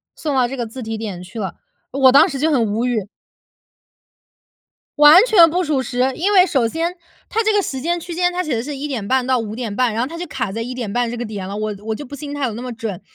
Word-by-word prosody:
送 295 -3 -3
到 255 -2 +3
这 265 - -5
个 240 - -2
自 250 +4 -9
提 225 0 -4
点 205 -5 -6
去 190 +6 -11
了， 195 -3 -4 0.4
“我 265 -1 +5
当 275 - +7
时 275 - -5
就 315 +3 +2
很 245 -6 +2
无 215 +3 -1
语。 225 -6 -1 1.9
完 300 +6 +9
全 355 -9 +6
不 360 +3 0
属 295 -5 0
实。 250 +1 0
因 390 +5 0
为 370 -2 +7
首 265 -10 +1
先， 330 +7 -2 0.3
它 450 +1 0
这 435 0 +2
个 410 - +3
时 270 -8 -4
间 345 +3 -1
区 345 +1 -7
间， 355 0 +1
它 365 +1 -1
写 305 - -2
的 225 - -2
是 290 +2 -5
1:30 260 -3 -1
到 255 0 +2
5:30， 225 +1 -2
然 225 - -1
后 250 - -1
它 330 +4 -8
就 350 - -4
卡 255 -8 -3
在 225 +3 -4
1:30 240 -1 -2
这 240 - -4
个 240 - -3
点 205 -4 -6
了， 200 - -5
我 215 0 -3
我 220 0 -2
就 290 - -8
不 285 +3 -9
信 285 +1 -7
它 285 -1 -1
有 235 - -3
那 230 - -6
么 250 0 -5
准。 220 -5 -5
255 Hz, 260 characters per minute, -19 LUFS, 225-300 Hz, 1.9 s, 完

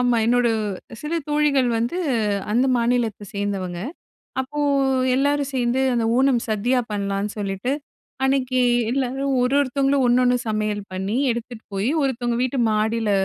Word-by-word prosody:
ஆமா 245 -1 +3
என்னோட 245 0 +3 0.5
சில 300 +3 -3
தோழிகள் 295 -4 +2
வந்து 235 +9 -1 0.6
அந்த 245 +4 +3
மாநிலத்த 235 -3 0
சேர்ந்தவங்க. 195 -3 -3 0.6
அப்போ 265 +3 -5 0.6
எல்லாரும் 285 +1 +1
சேர்ந்து 250 0 +1
அந்த 235 -1 +1
ஓணம் 260 -2 +3
சதியா 240 +4 +1
பண்ணலான்னு 200 0 -2
சொல்லிட்டு, 200 +5 -2 0.5
அன்னைக்கு 260 -1 +1 0.3
எல்லாரும் 270 +1 -1
ஒரு 250 +2 +1
ஒருத்தவங்களும் 275 0 +1
ஒன்னொன்னு 250 +1 +4
சமையல் 215 -1 -1
பண்ணி, 190 +4 -2 0.2
எடுத்துட்டு 235 -1 -7
போய் 205 +7 0
ஒருத்தவங்க 240 -3 -1
வீட்டு 255 0 0
மாடியில 220 +1 0
245 Hz, 125 wpm, -22 LUFS, 215-265 Hz, 0.6 s, ஒன்னொன்னு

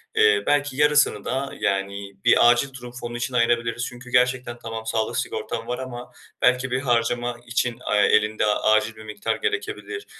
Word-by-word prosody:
eee, 105 -1 +4
belki 145 -2 +1
yarısını 150 -8 +3
da, 135 +2 -2
yani, 100 0 -2
bir 120 - +6
acil 130 +3 +2
durum 125 -2 -9
fonu 120 0 -5
için 125 +2 -3
ayırabiliriz. 120 0 +1
Çünkü 120 0 -12
gerçekten 125 -1 +1
tamam 115 0 -6
sağlık 110 0 -1
sigortan - - -4
var 125 - -3
ama 125 -2 -7 0.3
belki 125 +1 +2
bir 125 - +1
harcama 120 -1 0
için, 120 0 -1
aaa, 105 - -2
elinde 105 +1 +3
acil 110 +1 +2
bir 110 - -12
miktar 110 - -3
gerekebilir 430 -1 -4
120 Hz, 165 wpm, -23 LUFS, 110-130 Hz, 0.3 s, bir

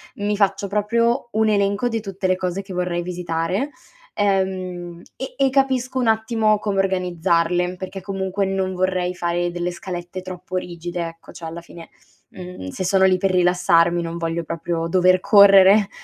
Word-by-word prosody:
mi 205 +1 -1
faccio 200 0 +1
proprio 230 +5 0
un 220 0 +2
elenco 200 +3 +1
di 225 -2 -2
tutte 195 -2 -3
le 185 - +2
cose 185 +1 -3
che 195 -1 -10
vorrei 180 -1 -1
visitare, 175 - -2 0.4
ehm, 185 -3 -2
e 265 - -6
e 270 -1 +3
capisco 260 -1 0
un 245 - 0
attimo 220 -1 +2
come 205 -2 -1
organizzarle, 180 -1 0
perché 185 +1 -7
comunque 195 +1 -2
non 190 -1 -1
vorrei 180 -1 -1
fare 175 0 -1
delle 175 0 -3
scalette 175 +1 -7
troppo 185 0 -8
rigide, 175 -1 -4
ecco. 165 0 -13
Cioè 170 - -10
alla 165 +1 -6
fine, 170 0 -13 0.4
mhmm, 180 - -9
se 185 - -5
sono 190 +1 +3
lì 185 -1 +4
per 195 0 0
rilassarmi 175 -1 +3
non 165 0 -5
voglio 165 0 -2
proprio 165 +1 -3
dover 185 +1 +3
correre 200 0 +6
185 Hz, 165 wpm, -21 LUFS, 175-200 Hz, 0.4 s, correre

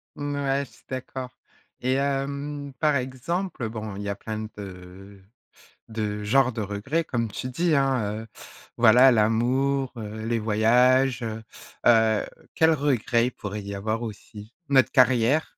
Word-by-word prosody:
Mmh 145 0 -4
ouais, 140 0 0
je - - -21
suis - - -22
d'accord 130 0 -5 0.5
et 130 +1 0
hem, 140 +1 -2
par 150 -2 +3
exemple, 130 - -3
bon, 110 -3 -6
il 100 - -5
y 100 - -4
a 100 - -2
plein 110 +1 -5
de 95 0 -11 0.7
de 105 -2 -3
genres 130 +3 +3
de 110 - -5
regrets 105 +11 -2
comme 115 -5 -2
tu 125 - -5
dis, 165 +5 +1
hein, 130 -7 +1
heu, - - -13 0.5
voilà 125 +3 +7
l'amour, 125 +5 +1
heu, 110 0 -6
les 115 0 0
voyages, 120 +4 +3
heu 110 -1 -4 0.4
heu 110 -2 +4 0.3
quels 160 0 +4
regrets 125 -4 +1
il - - -5
pourrait 105 -2 -6
y 100 0 -6
avoir 110 +4 -2
aussi? 105 0 -9 0.2
Notre 130 -4 +4
carrière! 130 +3 +4
120 Hz, 155 wpm, -25 LUFS, 110-135 Hz, 0.7 s, voilà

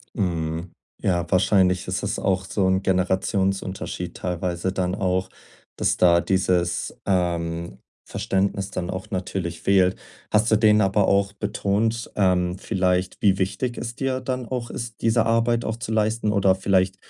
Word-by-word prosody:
Mhm. 85 -4 -2 0.3
Ja, 85 -2 0
wahrscheinlich 95 -1 +3
ist - - -2
es - - -2
auch 95 -1 0
so 95 +1 0
'n 95 +1 +2
Generationsunterschied 95 0 -1
teilweise 90 0 -2
dann 90 -1 -1
auch, 95 -1 0 0.5
dass - - +1
da 85 -1 +5
dieses, 90 -2 0
ähm, 85 -2 -1 0.3
Verständnis 95 0 -1
dann 90 -1 -4
auch 95 0 -5
natürlich 90 -2 -3
fehlt. 95 -2 +3 0.4
Hast 110 +2 +3
du 110 - +5
denen 105 0 +5
aber 100 0 +2
auch 100 0 +2
betont, 105 +2 -1
ähm, 90 -2 +2
vielleicht, 90 -1 0
wie 95 -2 +4
wichtig 100 +6 -2
es 120 0 -5
dir 135 -1 -1
dann 130 -1 -3
auch 125 -2 -4
ist, 115 -1 -6
diese 115 0 +3
Arbeit 115 +1 +2
auch 110 - -2
zu 115 -1 -5
leisten 110 0 +1
oder 100 -2 +3
vielleicht 95 0 +1
95 Hz, 150 wpm, -23 LUFS, 90-105 Hz, 0.5 s, da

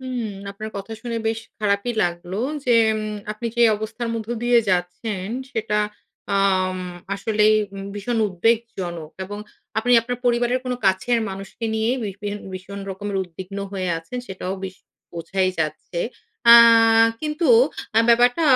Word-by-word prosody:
হুম। 255 -3 -3 0.3
আপনার 215 +2 -7
কথা 200 +3 -6
শুনে 235 -1 -3
বেশ 225 0 0 0.2
খারাপই 210 +2 0
লাগলো 175 +2 -3 0.3
যে 245 - +3 0.3
উম 215 0 -4 0.2
আপনি 235 +2 -5
যে 240 - +4
অবস্থার 225 +2 -4
মধ্য 225 -1 -5
দিয়ে 240 0 +5
যাচ্ছেন 185 +2 -2 0.3
সেটা 215 -3 0 0.6
আম 185 -1 +2 0.4
আসলেই 215 +1 +3 0.4
ভীষণ 225 +3 -2
উদ্বেগজনক। 185 -5 -1
এবং 205 +2 -7 0.4
আপনি 245 +2 +1
আপনার 245 +1 -4
পরিবারের 240 +1 +2
কোন 255 - -2
কাছের 210 +6 +2
মানুষকে 195 +4 -7
নিয়ে 220 +2 +1
ভিড় 200 -3 -4
ভিড় 205 0 -3 0.2
ভীষণ 195 +2 -7
রকমের 200 +1 -4
উদ্বিগ্ন 185 +2 -8
হয়ে 185 -2 -2
আছেন 205 +10 -7
সেটাও 190 0 -4
বেশ 190 -1 -7 0.4
বোঝাই 185 +3 -1
যাচ্ছে। 160 +2 -3 0.5
আ - - +12 0.7
কিন্তু 305 +2 -1 0.5
অ্যা 225 +1 +5
ব্যাপারটা 245 +5 +5
210 Hz, 140 wpm, -22 LUFS, 190-235 Hz, 0.7 s, আ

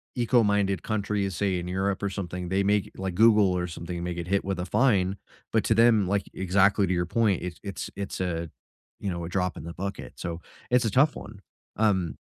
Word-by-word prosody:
eco-minded 105 -6 +2
countries, 100 -3 -1
say, 95 -1 0
in 85 - -6
Europe 95 +2 -1
or 100 - +1
something, 90 -2 -5
they 95 +1 +1
may 100 0 +3
g - - -15
like, 95 -2 -3
Google 105 -4 +5
or 90 - -1
something 85 +1 -6
may 90 0 -2
get 85 0 -5
hit 100 +1 +1
with 95 -2 -2
a 90 - -2
fine, 100 -3 +2 0.3
but 110 - +2
to 110 - +3
them, 110 -4 +5
like 100 0 0
exactly 100 +2 +3
to 90 - +1
your 85 0 0
point, 105 -3 +1
it's 90 -2 -6
it's 100 -1 -5
it's 100 -1 -5
a, 85 -3 -2 0.5
you 100 - -3
know, 85 -1 -4
a - - -6
drop 90 -1 -1
in - - -7
the 85 - -6
bucket, 100 +1 -6
so, 85 -1 -5 0.3
it's 125 -1 +4
a 110 - 0
tough 145 +6 +4
one, 105 -2 -10 0.4
um 95 -6 +1
95 Hz, 220 wpm, -27 LUFS, 90-105 Hz, 0.5 s, Google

